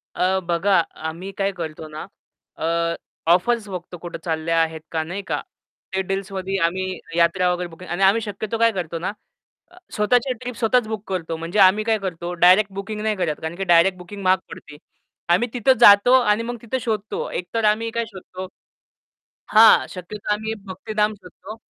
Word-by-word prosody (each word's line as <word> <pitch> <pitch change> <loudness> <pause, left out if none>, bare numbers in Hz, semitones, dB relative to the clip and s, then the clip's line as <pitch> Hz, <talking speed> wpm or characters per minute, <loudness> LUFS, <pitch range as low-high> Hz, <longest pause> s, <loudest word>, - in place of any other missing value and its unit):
अ, 190 +1 +1
बघा, 175 +2 +3 0.3
आम्ही 180 +5 -7
काय 195 0 0
करतो 160 -2 -6
ना, 155 0 -8 0.5
अ, 170 +1 0 0.4
ऑफर्स 215 +4 +1
बघतो, 180 -1 -7
कुठे 175 0 -7
चालल्या 165 0 -1
आहेत 160 -1 -2
का 160 -1 -1
नाही 185 +5 -5
का. - - -1 0.5
ते 190 - +1
डील्समध्ये 195 0 -3
आम्ही 185 +1 -2 0.2
यात्रा 175 +2 +3
वगैरे 175 0 -3
बुकिंग 170 +2 -12
आणि 175 +3 0
आम्ही 205 +4 +4
शक्यतो 210 +1 -4
काय 230 0 +4
करतो 170 -4 -4
ना, 185 +4 -2 0.6
अ, - - -19 0.2
स्वतःच्या 245 +5 +2
ट्रिप 250 -1 -6
स्वतःच 240 0 +2
बुक 215 -2 -4
करतो. 165 -3 -3
म्हणजे 165 +5 -4
आम्ही 195 +3 +5
काय 220 -1 +2
करतो, 175 -3 -5
डायरेक्ट 185 +4 +5
बुकिंग 200 +2 -5
नाही 215 0 0
करत, 170 -5 -1
कारण 160 +1 -4
की 195 - -3
डायरेक्ट 180 +1 +4
बुकिंग 195 +3 -9
महाग 185 +1 +4
पडते. 150 - -11 0.6
आम्ही 240 +6 +1
तिथे 250 +2 +4
जातो 205 +3 +8
आणि 210 -1 +2
मग 240 +1 -4
तिथं 235 +3 -2
शोधतो. 220 -3 -3
एकतर 215 +6 -3
आम्ही 220 +2 +2
काय 230 +1 -2
शोधतो 185 -2 -9 1.1
हां, 220 +1 +7
शक्यतो 200 +3 -5
आम्ही 220 +1 -4
भक्तिधाम 210 +2 -1
शोधतो. 200 +3 -12
190 Hz, 175 wpm, -22 LUFS, 175-215 Hz, 1.1 s, जातो